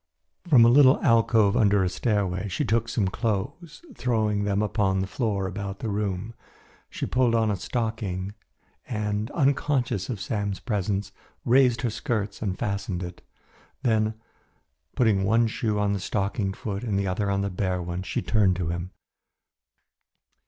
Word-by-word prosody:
From 130 -8 +7
a - - +6
little 130 +2 +6
alcove 115 -2 +4
under 100 -4 +4
a - - +1
stairway 100 -2 -1
she 95 - -2
took 115 +1 +1 0.2
clothes, 125 - -3
throwing 110 - 0
them 100 0 +1
upon 100 -3 +1
the 95 - 0
floor 100 -1 -1
about 100 +1 -4
the 110 - -4
room. 100 +1 -2 0.6
She - - -4
pulled 125 -2 +2
on 110 -2 +2
a - - 0
stocking 100 -3 -3 0.5
and, 105 -2 -2
unconscious 135 - 0
of 115 -6 -3
Sam's 100 -2 -2
presence, 100 -3 -2 0.3
raised 125 -2 +4
her 120 - 0
skirts 105 -5 -3
and 95 -4 -2
fastened 100 -2 -3
it. 90 0 -8 0.6
Then, 110 -3 +1 0.8
putting 110 -6 +3
one 115 +4 +3
shoe 110 -1 -1
on 105 0 +1
the 100 - -1
stockinged 100 0 -2
foot 100 -1 -4
and 105 -5 -1
the 100 - 0
other 100 +2 -1
on 100 0 +1
the 100 0 -2
bare 90 0 -1
one, 90 +1 -4
she 95 - -3
turned 95 +1 +3
to 85 -2 -2
him. 85 +1 -4
105 Hz, 155 wpm, -26 LUFS, 95-115 Hz, 0.8 s, From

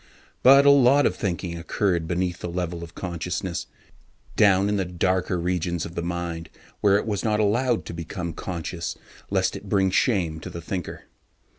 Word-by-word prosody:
But 140 +2 +7
a 140 - +8
lot 140 +1 +5
of - - +2
human - - -16
thinking 85 -4 -2
occurred 85 -1 0
beneath 90 0 -1
the 90 - -5
level 85 -1 -3
of 85 0 -11
consciousness, 90 0 -4 0.7
down 100 -1 +4
in 105 0 +1
the 95 - +1
darker 90 +1 0
regions 85 -1 -1
of 80 - -8
the 85 - -3
mind 85 -1 -4 0.3
where 100 -1 +4
it - - -2
was 105 -3 -2
not 110 -1 +1
allowed 115 +3 +1
to - - -6
become 85 +1 -5
conscious 85 -1 -5 0.3
lest 95 -1 +1
it 100 0 -9
bring 95 -2 +2
shame 90 -8 +1
to - - -8
the 85 - -7
thinker. 90 +1 -5
90 Hz, 180 wpm, -24 LUFS, 85-100 Hz, 0.7 s, a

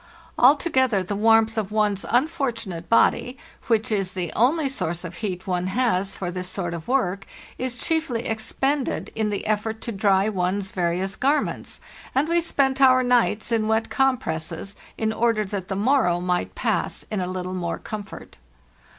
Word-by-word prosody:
Altogether 260 - +4
the 200 +3 -3
warmth 225 +1 +4
of 210 -2 -4
one's 210 -2 +1
unfortunate 245 - -1
body, 245 +2 +3 0.3
which 225 +1 +1
is 195 -3 -1
the 180 -3 -3
only 280 +6 +3
source 175 -11 -2
of 170 -1 -7
heat 185 -5 -4
one 180 -1 -1
has 195 -3 0
for 180 -2 -4
this 180 0 -4
sort 175 -2 -3
of 165 -1 -7
work, 200 -7 0 0.3
is 255 -1 -2
chiefly 315 -8 0
ex 220 -1 -3
pended 275 0 -1
in 220 -1 -1
the 205 - -3
effort 220 +1 -1
to 235 - -3
dry 195 -1 +2
one's 190 -1 -1
various 180 +2 -1
garments; 285 +3 -1 0.4
and 275 +4 +2
we 340 +1 +2
spent 275 -4 +1
our 255 -1 +6
nights 240 -3 +2
in 220 -2 +1
wet 220 +1 0
compresses, 195 -8 -1 0.2
in 220 0 0
order 225 -2 +1
that 190 -2 -5
the 195 - -3
morrow 210 -5 +2
might 180 0 -1
pass - - -1
in 210 -3 -1
a 180 - -2
little 185 0 -4
more 175 -2 -2
comfort. 210 -2 -8
215 Hz, 170 wpm, -24 LUFS, 185-250 Hz, 0.4 s, our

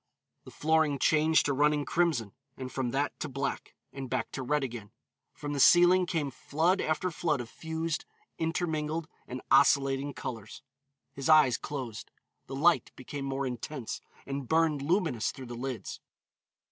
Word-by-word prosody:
The - - -10
flooring 160 -2 +2
changed 155 +3 +3
to 145 - +1
running 145 +1 +2
crimson, 155 - 0 0.2
and 130 -1 -6
from 130 -2 -2
that 140 +4 -1
to 155 - -3
black, 135 +1 -4 0.2
and 135 -2 -6
back - - -2
to 135 - -4
red 150 +3 0
again. 120 -5 -6 0.4
From 145 0 -6
the 140 - -2
ceiling 175 +4 +6
came 155 -6 -1
flood 165 +9 +1
after 160 +4 0
flood 155 -2 0
of 120 - -5
fused, 160 0 -3 0.3
intermingled 160 -1 -1 0.2
and 125 0 -6
oscillating 135 0 +4
colors. 110 -4 -7 0.5
His 135 +2 -3
eyes 150 -6 +7
closed. 130 -6 -6 0.4
The 135 - -6
light 170 +5 +3
became 135 +2 -6
more 135 0 -2
intense, 125 0 -5 0.2
and 140 -2 -4
burned 160 -2 +2
luminous 155 - +1
through 130 - -9
the 120 - -7
lids. 120 -4 -5
145 Hz, 155 wpm, -30 LUFS, 130-160 Hz, 0.5 s, eyes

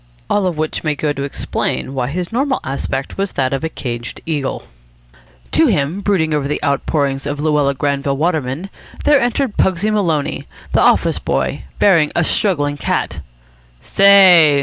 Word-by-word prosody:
All 205 -2 +2
of 175 -4 -3
which 155 0 -3
may 155 -2 0
go 145 0 -1
to 140 - -6
explain 140 -1 -3
why 130 -2 -1
his 175 - -4
normal 265 +3 0
aspect 135 +1 -4
was 195 0 -2
that 130 -1 0
of 135 - -2
a 160 - -1
caged 120 -5 -6
eagle. 145 -5 -3 0.9
To - - +4
him, 150 +8 0
brooding 170 -7 +1
over 145 -2 0
the 150 - -2
outpourings 140 -1 -1
of 145 0 -3
Luella 150 -2 +1
Granville 140 0 -1
Waterman, 160 +2 -2 0.3
there 290 -2 +5
entered 245 -1 -1
Pugsy 190 +3 +1
Maloney, 165 -9 -1 0.3
the - - +3
office - - +3
boy, 65 -2 -2
bearing 170 -7 +4
a 175 - +2
struggling 145 -6 0
cat. - - -2 0.6
"Say!" 185 -7 +6
150 Hz, 160 wpm, -17 LUFS, 140-185 Hz, 0.9 s, Say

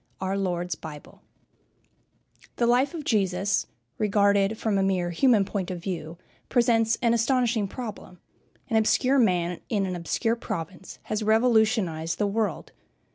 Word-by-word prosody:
X - - -42
OUR 190 +1 -1
LORD'S 180 -3 -2
BIBLE 155 -2 -11 1.3
The 240 - +1
life 250 +7 +2
of 315 - -5
Jesus, 195 -4 0 0.3
regarded 200 0 +2
from 210 -3 0
a - - +2
mere 185 -2 0
human 215 +2 +3
point 190 -2 -3
of 180 - -4
view, 170 -2 -5 0.3
presents 230 -2 +2
an 235 -1 +4
astonishing 235 -2 +1
problem. 210 -5 -8 0.5
An 225 - +1
obscure 255 +5 +3
man 180 -6 +1
in 205 -3 0
an 185 -1 -3
obscure 225 +7 -1
province 175 -2 -6
has 215 - -3
revolutionized 220 -7 +2
the 210 - +1
world. 210 +2 -2
205 Hz, 140 wpm, -26 LUFS, 180-230 Hz, 1.3 s, an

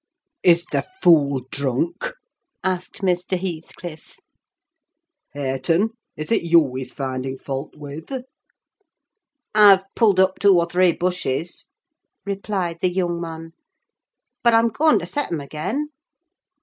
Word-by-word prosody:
"Is 170 -1 +4
the - - +1 0.2
fool 140 -6 +5
drunk?" 140 - -2 0.5
asked 185 +1 -3
Mr. 180 0 0
Heathcliff. 170 -2 -7 1.2
"Hareton, 145 +9 0 0.3
is 155 +7 -5
it - - +3
you 165 -6 +4
he's 130 0 -5
finding 130 -1 -4
fault 135 +2 -5
with?" 145 +2 -9 1.4
"I've 200 -3 +7
pulled 205 -5 +4
up 190 0 +3
two 200 -3 +6
or 170 - +3
three 180 0 +3
bushes," 175 -3 -2 0.6
replied 195 -4 -3
the 185 - +3
young 175 -2 -1
man; 165 -1 -7 0.9
"but 235 -1 +5
I'm 230 +1 +4
going 305 +8 +3
to - - -3
set 290 -7 -2
'em 165 - -1
again." 155 - -3
175 Hz, 120 wpm, -22 LUFS, 150-190 Hz, 1.4 s, I've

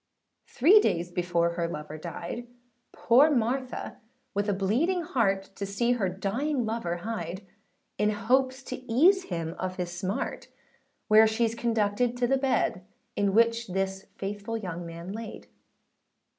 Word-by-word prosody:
Three 350 - +6
days 175 - 0
before 175 -1 +1
her 170 0 -2
lover 150 -2 -6
died, 175 +8 -6 0.4
Poor 265 +6 +5
Martha 255 -1 -1 0.4
with 205 +1 0
a - - +2
bleeding 255 - +1
heart, 195 -10 0
To - - -4
see 200 +5 0
her 215 -6 +1
dying 235 +9 -1
lover 220 -6 -2
hied, 190 -4 -4 0.5
In 210 - +3
hopes 260 +5 +1
to 255 - -5
ease 365 +11 +5
him 165 -2 -3
of 185 0 -3
his 180 -1 -3
smart; 190 +3 -3 0.6
Where 215 0 +7
sheâs 225 +1 +1
conducted 230 +1 0
to 245 - +1
the 270 +2 +2
bed, 260 -8 0 0.3
In 200 -1 +1
which 230 +1 +3
this 190 +1 -3
faithful 205 +3 -4
young 175 -5 -5
man 170 +2 -7
laid. 225 0 -7
210 Hz, 145 wpm, -28 LUFS, 185-240 Hz, 0.6 s, Where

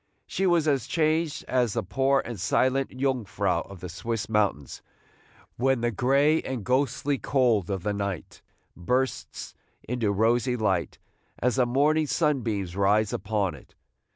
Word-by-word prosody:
She 195 - -1
was 170 -3 +3
as 140 -5 +1
changed 155 -1 0
as 125 -4 +1
the - - -1
poor 135 +7 +1
and 120 -4 -6
silent 130 +8 +1
Jungfrau 130 -7 0
of 100 -3 -11
the 90 - -5
Swiss 105 +4 -4
mountains, 100 -10 -1 0.8
when 130 0 +1
the 120 0 +1
gray 140 +8 +3
and 130 -5 -5
ghostly 135 +1 0
cold 120 -9 +1
of 95 -3 -3
the 105 0 -1
night 100 -4 -5 0.3
bursts 125 +9 -2 0.3
into 115 -4 0
rosy 115 +4 +1
light, 105 -4 -1 0.4
as 125 +1 0
the 125 -2 +3
morning 150 +5 +2
sunbeams 115 - -1
rise 100 +2 +2
upon 100 -1 -1
it. - - -15
120 Hz, 145 wpm, -26 LUFS, 105-135 Hz, 0.8 s, was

